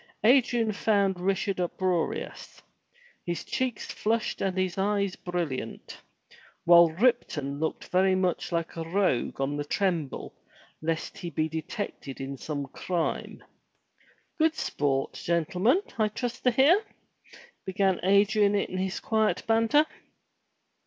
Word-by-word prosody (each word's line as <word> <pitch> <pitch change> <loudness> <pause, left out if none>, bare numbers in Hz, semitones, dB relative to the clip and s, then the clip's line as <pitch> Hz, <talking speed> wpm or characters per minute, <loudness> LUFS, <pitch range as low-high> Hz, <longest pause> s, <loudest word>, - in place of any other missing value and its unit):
Adrian 240 -2 +4
found 200 -3 +1
Richard 195 +1 0
uproarious, 180 -1 -2 0.6
his 175 -1 -3
cheeks 255 -4 -2
flushed 225 +2 -1
and 190 -1 -1
his 185 -2 0
eyes 200 -1 0
brilliant, 165 -10 -5 0.6
while 170 -1 +8
Ripton 160 - 0
looked 160 0 -3
very 185 +1 +3
much 185 -1 -1
like 170 -1 -2
a 165 - -3
rogue 165 -8 0
on 135 +1 -1
the 145 - -2
tremble 165 -3 -2 0.5
lest 165 0 -3
he 175 - -5
be 155 -1 -1
detected 160 - -5
in 135 +1 -5
some 145 +1 -4
crime. 175 +3 -3 1.0
Good 320 0 +3
sport, 135 - -1
gentlemen, 180 - +1 0.2
I 215 - +4
trust 240 +3 -4
to - - +7
hear?" 285 - +4 0.8
began 190 0 +1
Adrian 200 +2 +4
in 185 -2 -1
his 190 0 -2
quiet 220 -1 +1
banter. 225 +7 +4
185 Hz, 120 wpm, -27 LUFS, 165-215 Hz, 1.0 s, while